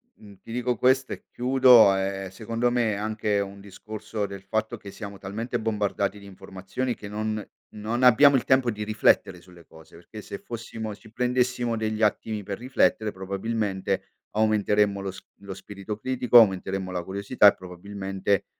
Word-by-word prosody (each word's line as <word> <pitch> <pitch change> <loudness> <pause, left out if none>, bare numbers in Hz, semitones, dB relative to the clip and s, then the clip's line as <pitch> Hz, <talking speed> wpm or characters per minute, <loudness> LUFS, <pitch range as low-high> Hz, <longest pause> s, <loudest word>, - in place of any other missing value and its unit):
mhmm, 100 -2 -16
ti - - -12
dico 125 +1 -1
questo 130 +2 +2
e - - -11
chiudo, 125 -5 +6
ehm, 95 0 -3
secondo 115 +5 -2
me 120 -3 +1
è - - -2
anche 105 0 -1
un 100 0 -5
discorso 105 +2 -6
del 100 -1 -8
fatto 110 +3 -2
che 105 - -11
siamo 100 -2 -8
talmente 115 +5 -4
bombardati 105 -2 -1
d'informazioni 100 +5 -5
che 105 - -10
non 110 +1 -3 0.3
non 110 +4 -2
abbiamo 135 +3 +7
il 125 - -3
tempo 130 -2 +3
di 105 -1 -5
riflettere 105 -4 +2
sulle 90 -2 -17
cose 80 0 -17
perché 95 +6 -11
se 100 - -7
fossimo 110 -2 -7
ci 110 - -18
prendessimo 125 0 0
degli 110 0 -2
attimi 105 0 0
per 100 0 -5
riflettere, 120 -3 +1
probabilmente, 95 0 -3 0.2
aumenteremmo 105 -2 +2
lo 95 0 -4
s 95 - -11 0.2
lo 100 -1 -8
spirito 100 +2 -8
critico, 125 0 +3
aumenteremmo 95 -2 +1
la 90 -1 -3
curiosità 100 +4 +3
e, 100 - +6
probabilmente, 95 +2 -3
105 Hz, 165 wpm, -25 LUFS, 100-115 Hz, 0.3 s, abbiamo